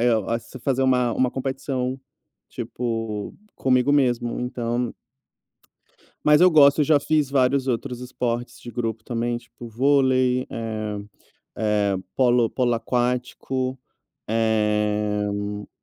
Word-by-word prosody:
eh, 120 +1 +3 0.2
as 115 0 -3
fazer 135 -1 +1
uma 125 -2 +2
uma 130 +1 +1
competição, 130 0 -3 0.5
tipo, 115 -3 -4 0.2
comigo 130 +1 +2
mesmo. 120 -4 +1
Então 120 -1 -2 1.3
Mas 150 +1 +5
eu 180 0 +7
gosto. 145 -1 +6
Eu - - +2
já 150 0 +4
fiz 150 -1 +1
vários 135 0 +2
outros 125 0 -2
esportes 120 -1 -3
de 120 - -9
grupo 115 -2 -3
também, 120 0 -2
tipo, 120 0 -12
vôlei, 130 0 +2
eh 110 -2 -4 0.6
eh, 105 -2 +1 0.2
polo 120 -3 +3
polo 125 -2 +1
aquático, 125 +2 -1 0.5
eh. 105 -2 0
125 Hz, 115 wpm, -23 LUFS, 115-130 Hz, 1.3 s, eu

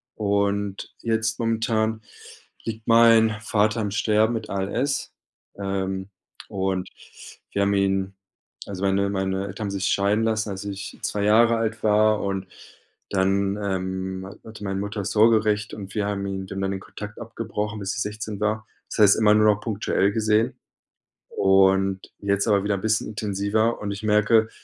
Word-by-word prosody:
Und 100 -1 -1
jetzt 115 0 -1
momentan 110 -1 0 0.6
liegt 110 -1 -6
mein 115 -1 +6
Vater 110 0 +1
im 105 - -2
Sterben 110 +2 +2
mit 115 - -4
ALS. 115 +8 -2 0.4
Ähm, 95 -1 -3 0.4
und 95 -2 -2 0.6
wir 100 - 0
haben 100 0 +2
ihn, 95 -1 +1 0.5
also, 100 -1 -6
meine 100 0 +2
meine 95 0 -1
Eltern 100 +2 -5
haben - - -3
sich 100 -1 -2
scheiden 100 +3 +2
lassen, 110 -1 0
als 95 +1 -6
ich 100 -1 -6
2 100 -1 -1
Jahre 115 +3 +5
alt 115 0 -2
war 110 0 +3
und 95 -1 -3 0.6
dann, 100 +1 +1
ähm, 95 -1 -3
ha 95 - -10
hatte 110 -1 -10
meine 95 0 -2
Mutter 105 +1 -4
das 100 - -3
Sorgerecht 110 -1 +3
und 100 -1 -8
wir 105 - 0
haben 100 -1 -2
ihn 95 -1 -4
dann 95 +1 -5
den 95 0 -1
Kontakt 105 0 -9
abgebrochen, 110 -2 -4
bis 100 0 -3
ich 110 - -2
16 105 0 -5
war. 110 +1 -1 0.2
Das - - -6
heißt 105 -2 +7
immer 105 -1 +5
nur 110 0 +4
noch 105 - -13
punktuell 100 -2 0
gesehen 110 +3 +1 0.7
und 95 0 +3 0.2
jetzt 100 0 0
aber 100 -3 +3
wieder 100 0 0
'n 95 - -5
bisschen 110 0 +1
intensiver 105 +2 0
und 105 - -3
ich 100 +1 -6
merke, 110 +1 +3
105 Hz, 165 wpm, -24 LUFS, 95-110 Hz, 0.7 s, heißt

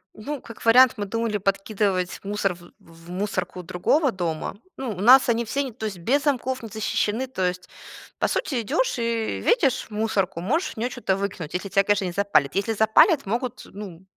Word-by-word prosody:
Ну 280 +5 -6
как 230 - -12
вариант, 250 +2 +7
мы 205 - -2
думали 230 +1 -1
подкидывать 195 -1 -1
мусор 200 -2 -1
в 175 0 -16
в 165 +1 -17
мусорку 185 -1 -3
другого 260 - +1
дома. 170 -5 -3 0.2
Ну 265 - -4
у 190 - -7
нас 255 +4 +7
они 235 0 +1
все, 275 +6 -1
не 265 - -5
то 220 -1 -7
есть 200 -4 -4
без 270 +11 +1
замков, 260 -3 -1
не 225 - -7
защищены. 220 +3 -1
То 190 -8 -1
есть, 180 0 -5 0.5
по - - +1
сути, 275 - -1
идешь 305 - 0
и 230 -2 -1
видишь 275 - +2
мусорку, 205 -5 -1
можешь 305 - 0
в - - -27
неё 235 +3 -1
чё-то 245 -6 -1
выкинуть, 185 -5 -4
если 185 +2 -3
тя, 195 +1 +3
конечно, 205 -1 +1
не 180 - -2
запалят. 175 -7 +1
Если 200 +3 0
запалят, 220 - +4
могут, 240 +4 -3
ну, 190 -3 -9
210 Hz, 195 wpm, -24 LUFS, 190-245 Hz, 0.5 s, вариант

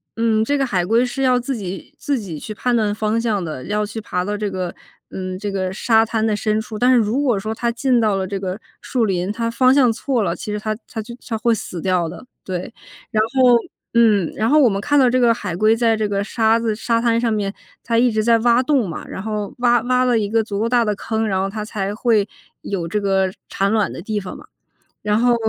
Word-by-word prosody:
嗯， 225 -1 +2
这 285 +5 +1
个 275 - +1
海 185 -8 0
龟 230 +6 +3
是 260 +2 -4
要 255 -1 +4
自 245 +1 -3
己 195 +6 -7
自 285 -2 -1
己 185 -9 -6
去 215 - -6
判 245 +4 -1
断 210 -3 +1
方 215 +1 0
向 220 -5 0
的， 155 -6 -6
要 210 +1 -1
去 220 +2 -6
爬 180 -3 -2
到 205 +1 -2
这 210 -1 -2
个， 185 -2 -4 0.4
嗯， 185 -1 -5
这 205 0 -4
个 190 -1 -2
沙 225 +3 +3
滩 220 -1 -1
的 215 -1 +1
深 215 0 0
处。 220 -1 -6
但 250 - +4
是 - - +5
如 230 +4 +1
果 245 -8 +1
说 215 +3 -3
它 235 +1 -1
进 245 +1 +1
到 215 -3 +2
了 190 -1 -1
这 195 +1 -4
个 190 +1 -4 0.2
树 245 -3 0
林， 185 -1 -1
它 230 +1 -2
方 255 +2 +4
向 255 -4 +4
错 245 0 -1
了， - - -1
其 210 - -6
实 210 - -2
它 215 0 -2
它 225 - -6
就 225 +2 -6
它 225 - -2
会 235 +1 +2
死 185 -4 -5
掉 180 -1 0
的。 175 - -10 0.2
对， 185 +4 -5 0.4
然 215 -1 +2
后 255 -2 +6 0.4
嗯， 215 -7 +4
然 220 +1 0
后 305 - +5
我 275 - +6
们 195 -3 0
看 290 +6 +1
到 260 - +5
这 255 +1 +2
个 240 -2 +5
海 205 -6 -3
龟 215 +4 +3
在 225 -1 +2
这 215 -1 -1
个 200 0 0
沙 225 +1 +2
子 230 -2 -1
沙 230 +1 0
滩 230 -1 +2
上 235 -2 +1
面 205 -2 -1 0.3
它 230 0 +1
一 245 - +4
直 215 0 0
在 230 0 +4
挖 240 +2 +3
洞 255 -7 +1
嘛， 165 - -7
然 - - -6
后 210 -1 -4
挖 240 0 +4
挖 255 +1 +2
了 245 -2 +3
一 210 -2 0
个 225 +2 +1
足 205 -2 -4
够 225 - +1
大 240 0 +3
的 210 -2 0
坑， 220 +2 -2
然 190 -2 0
后 190 - 0
它 210 +2 -5
才 205 -2 -3
会 215 -2 +2 0.3
有 180 -4 -3
这 210 +5 -1
个 195 -1 +1 0.2
产 195 +1 0
卵 215 -2 +1
的 - - -7
地 215 -1 -2
方 185 -2 -7
嘛。 - - -13 0.5
然 210 0 +1
后， 245 +1 +4
220 Hz, 275 characters per minute, -20 LUFS, 200-235 Hz, 0.5 s, 后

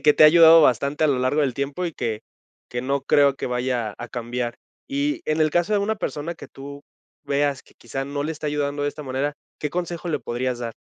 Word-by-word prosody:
que - - -23
que 150 - +6
te 155 - +6
ha - - +11
ayudado 165 +1 +8
bastante 140 +4 +2
a - - +5
lo 140 -3 +1
largo 130 +4 +1
del 135 -4 0
tiempo 140 +7 -2
y 165 - -4
que 115 -6 -3 0.5
que 120 0 -4
no 140 +1 -1
creo 140 -1 +4
que - - -4
vaya 125 -3 -1
a 120 - -7
cambiar. 120 0 -4 0.3
Y 285 +2 -1
en 155 +1 0
el 155 0 +3
caso 175 +6 +1
de 205 - +4
una 205 +2 0
persona 165 -1 -4
que - - -12
tú 140 +1 -10 0.4
veas 140 -1 0
que - - -24
quizá 135 +3 -5
no 145 +1 -3
le 160 - -2
está 150 0 -6
ayudando 145 0 -1
de 145 - +1
esta 150 +1 -7
manera, 135 +2 -2 0.3
¿qué 150 - -2
consejo 175 -1 -4
le 150 - 0
podrías 125 0 -3
dar? 115 -2 -5
145 Hz, 245 wpm, -23 LUFS, 130-155 Hz, 0.5 s, ha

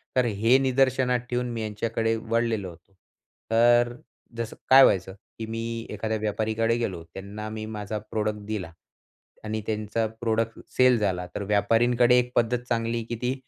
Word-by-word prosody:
तर 125 - +3
हे 115 +3 +3
निदर्शनात 130 -1 +2
ठेऊन 125 0 -1
मी 115 -1 -4
यांच्याकडे 115 +1 -1
वळलेलो 115 -3 -1
होतो. 85 +3 -17 0.6
तर 120 +1 +4 0.4
जसं 115 -1 -4
काय 135 +1 +9
व्हायचं, 95 -3 +3 0.3
की 110 - -3
मी 115 +1 -4
एखाद्या 110 +1 -2
व्यापारीकडे 110 +2 0
गेलो 95 -8 -3
त्यांना 105 +2 -7
मी 110 0 -5
माझा 105 0 -4
प्रोडक्ट 105 -1 -1
दिला. 100 -6 -4 0.7
आणि 110 0 -3
त्यांचा 110 +1 -1 0.2
प्रोडक्ट 115 0 -1 0.2
सेल 130 -1 +6
झाला, 90 -3 -1
तर 100 - -3
व्यापारींकडे 115 +4 +3
एक 125 0 -2
पद्धत 120 +1 +2
चांगली 115 -1 -1
की 120 - -2
ती 125 +1 0
115 Hz, 150 wpm, -26 LUFS, 105-120 Hz, 0.7 s, काय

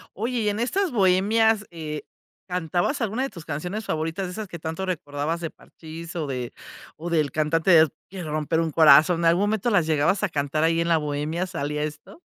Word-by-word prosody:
Oye, 235 +5 -2
y 210 - +1
en 205 +1 -1
estas 370 +10 0
bohemias, 210 +1 +3
eh, 155 -3 -6 0.5
¿cantabas 180 - -1
alguna 230 +2 -1
de 270 - -1
tus 170 - -11
canciones 175 +8 -4
favoritas?, 160 +4 -2
de 180 - -6
esas 215 +1 -6
que 170 - -8
tanto 160 +4 -4
recordabas, 150 -2 -3
de 165 -2 -4
Parchís 165 +1 -11
o 160 -3 -2
de 125 -3 -4 0.4
o 170 +3 -6
del 155 -4 +1
cantante 155 +4 +1
de 160 -2 +7 0.2
quiero 180 -5 -7
romper 155 +2 0
un 165 -1 0
corazón. 160 +2 +6
¿En - - -1
algún 170 +3 +4
momento 215 +2 0
las 175 -7 +3
llegabas 155 +6 +2
a 210 - +2
cantar, 150 0 -1
ahí 165 0 +2
en 170 - 0
la 165 -1 +4
bohemia, 150 +4 -2
salía 150 -4 -3
esto? 150 - -7
165 Hz, 205 wpm, -24 LUFS, 155-195 Hz, 0.5 s, de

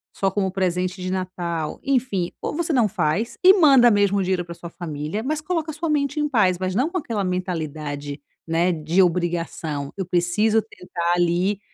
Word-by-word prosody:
só 195 - +1
como 190 -1 -1
presente 185 0 -1
de 185 - -3
Natal". 175 -4 -3
Enfim, 245 -10 0
ou - - -3
você 335 0 -1
não 235 -5 +4
faz 190 +4 -1
e 375 +1 +9
manda 270 -6 +7
mesmo 200 -1 +3
o 195 - +1
dinheiro 180 -1 -1
pra 170 - -7
sua 170 0 -9
família, 160 +4 -5
mas 305 +3 -2
coloca 320 -1 -2
a - - -9
sua 320 +1 -3
mente 285 -1 0
em 300 - +1
paz, 190 -8 +3
mas 185 0 -2
não 260 +8 +2
com 370 - -3
aquela 225 - -2
mentalidade, 155 -6 -4 0.3
né, 170 +2 +2
de 165 +3 +1
obrigação: 170 -5 -1
"Eu 190 - -2
preciso 180 +6 +2
tentar 175 -5 -3
ali", 175 +3 +1
185 Hz, 190 wpm, -23 LUFS, 170-225 Hz, 0.3 s, e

